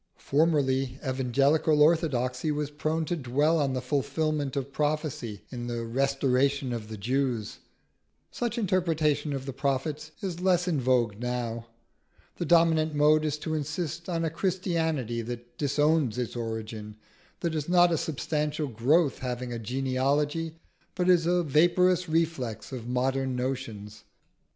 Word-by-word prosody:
Formerly, 135 -4 +1
evangelical 135 +4 +2
orthodoxy 150 -4 +2
was 150 0 -2
prone 155 +2 -1
to 175 - -1
dwell 150 +3 +1
on 140 -3 +1
the 130 -1 -2
fulfilment 145 +1 -1
of 140 0 -3
prophecy 145 -8 -2
in 120 -2 -5
the 120 -1 -3
"restoration 135 +1 +1
of 115 -3 -5
the 110 0 -7
Jews." 125 0 -1 0.7
Such 240 -1 -3
interpretation 165 -8 +1
of 135 -1 -3
the 135 - -5
prophets 140 +3 -2
is 180 -4 -4
less 180 -1 +2
in 155 -6 +1
vogue 120 -5 +1
now. 120 -1 -3 0.7
The 175 - -2
dominant 160 -2 +4
mode 150 +1 +4
is 150 -1 -1
to 160 - -3
insist 160 +3 -3
on 165 -2 0
a 160 - -1
Christianity 160 - -1
that 120 +1 -7
disowns 145 -3 +2
its 125 -1 -3
origin, 110 -2 -5 0.5
that 170 -2 -1
is 155 0 -3
not 175 -1 +5
a - - +3
substantial 150 0 -2
growth 135 +7 +2
having 125 -1 -4
a 115 - -4
genealogy, 135 +6 0 0.4
but 180 -1 +1
is 170 -2 +3
a 175 0 +2
vaporous 175 +4 +3
reflex 160 -8 -1
of 120 -3 -6
modern 130 +1 0
notions. 115 -5 -4
140 Hz, 140 wpm, -28 LUFS, 125-160 Hz, 0.7 s, not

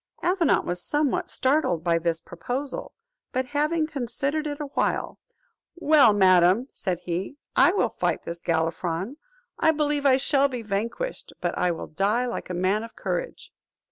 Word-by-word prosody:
Avenant 355 -3 +2
was 175 0 -3
somewhat 295 -2 0
startled 260 - +1
by 170 -1 +2
this 165 -1 0
proposal; 250 - -4 0.4
but, 255 +1 -1
having 300 +4 0
considered 285 +2 -2
it 290 0 -4
awhile, 290 -2 -2 0.6
"Well, 300 -8 +5
madam," 190 +4 +4
said 180 -4 -2
he, 180 +9 -4 0.2
"I - - +6
will 405 - +2
fight - - -1
this 170 0 -6
Galifron; 170 - -1 0.4
I - - +4
believe 295 -2 +1
I 260 -1 +5
shall 275 +1 +3
be 250 -4 -5
vanquished; 225 - -4
but - - -2
I 180 - +1
will 170 - -3
die 205 +9 0
like 240 - -5
a 180 - -3
man 185 +4 +1
of 230 - -10
courage." - - -4
245 Hz, 155 wpm, -25 LUFS, 180-290 Hz, 0.6 s, I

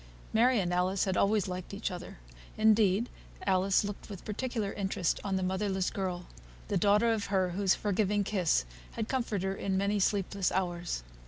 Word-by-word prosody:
Mary 240 +2 +4
and 180 -2 -1
Alice 185 +2 +1
had 190 -1 0
always 205 0 +2
liked 180 +1 -5
each 205 - -3
other; 180 0 -8 0.4
indeed, 215 0 +4 0.4
Alice 190 +1 +3
looked 205 +1 -6
with 195 -3 -9
particular 220 -1 -2
interest 190 -3 -1
on 195 -2 -1
the 190 - 0
motherless 190 0 0
girl, 180 -2 -3 0.4
the - - 0
daughter 210 +5 +4
of 215 -2 -2
her 190 -2 +1
whose 190 +1 +2
forgiving 205 0 +1
kiss 185 - +1 0.3
had 220 - -2
so - - -21
comforted 230 -7 -1
her 190 0 0
in 190 -1 -1
many 200 +1 +1
sleepless 195 -1 +1
hours. 175 - -2
195 Hz, 175 wpm, -31 LUFS, 185-210 Hz, 0.4 s, Mary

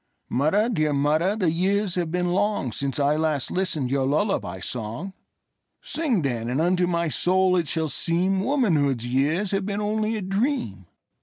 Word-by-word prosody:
Mother, 155 - +2
dear 155 -10 0
mother, 155 +7 +2
the 185 -7 +1
years 195 +3 0
have 175 -3 -1
been 180 +1 0
longSince 140 - -1
I 145 +1 +2
last 155 -4 0
listened 160 -9 -1
your 135 -1 +1
lullaby 145 - 0
song:Sing, 190 - -5
then, 120 -4 -2
and 130 +4 -1
unto 180 +2 +2
my 170 -1 0
soul 185 +4 +2
it 170 -4 0
shall 160 0 -1
seemWomanhood's 175 - +1
years 145 +10 0
have 195 0 -1
been 205 0 -2
only 215 +1 -1
a 210 - -4
dream. 195 - -2
175 Hz, 150 wpm, -24 LUFS, 140-195 Hz, -, Mother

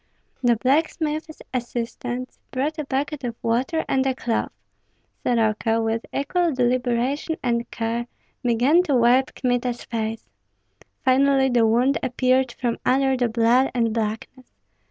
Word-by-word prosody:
The 240 -2 +4
blacksmith's 310 +4 -1
assistants 245 0 -4
brought 295 +5 -2
a 300 - -2
bucket 280 +1 -2
of 235 -2 -3
water 255 +8 0
and 265 -1 +2
a 260 - 0
cloth. 235 -3 -2 0.7
Soroka, 225 -1 +1
with 225 0 -1
equal 340 +5 0
deliberation 250 +4 0
and 235 -1 0
care, 230 +1 -3 0.3
began 245 +8 +3
to 285 - +1
wipe 250 +2 +3
Kmita's 245 -1 -1
face. 225 -1 -4 0.8
Finally 270 +1 +4
the 240 -3 +3
wound 245 +5 +2
appeared 255 0 +1
from 240 -2 -2
under 265 +1 +2
the 245 -2 0
blood 235 +3 +3
and 230 -2 +1
blackness. 225 +3 -4
250 Hz, 130 wpm, -23 LUFS, 235-270 Hz, 0.8 s, The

